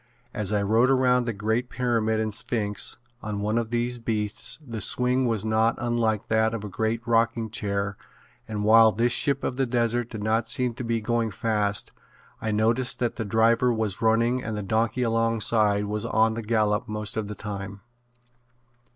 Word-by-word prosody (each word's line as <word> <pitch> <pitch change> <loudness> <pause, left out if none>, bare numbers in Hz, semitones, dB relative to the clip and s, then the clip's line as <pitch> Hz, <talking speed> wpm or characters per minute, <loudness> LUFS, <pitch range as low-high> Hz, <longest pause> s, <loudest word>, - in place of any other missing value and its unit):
As 105 -4 -2
I 105 -1 +1
rode 115 +5 +3
around 125 -2 +3
the 120 - -1
great 110 +4 -1
pyramid 115 -3 0
and 110 -1 -2
sphinx 105 -2 -2 0.2
on 105 -1 -4
one 105 +3 0
of 115 -1 -3
these 120 +1 -1
beasts 110 -3 -1
the 115 -4 -6
swing 125 +1 +2
was 110 -3 -1
not 110 +1 +2
unlike 115 -2 -1
that 110 0 +1
of 110 - -6
a 105 - -5
great 110 +4 -2
rocking 115 -1 +1
chair 100 -2 -2 0.5
and 105 -2 -3
while 110 +1 +6
this 115 +4 +1
ship 140 +2 +2
of 125 - -2
the 135 -1 +1
desert 120 0 0
did 110 -2 -6
not 110 +1 +1
seem 125 -2 0
to 125 - -7
be 115 -1 -1
going 115 0 0
fast 105 -1 -1 0.5
I 110 - -2
noticed 115 +4 +1
that 120 -2 -2
the 115 - -3
driver 115 +3 +3
was 110 -4 -2
running 115 +3 +2
and 110 -2 -4
the 105 - -4
donkey 110 +5 0
alongside 115 -2 +2
was 105 +1 -3
on 110 -1 +2
the 115 - -4
gallop 105 -2 0
most 105 -1 -4
of 110 -2 -2
the 105 - -6
time. 100 -1 -7
110 Hz, 185 wpm, -25 LUFS, 105-120 Hz, 0.5 s, while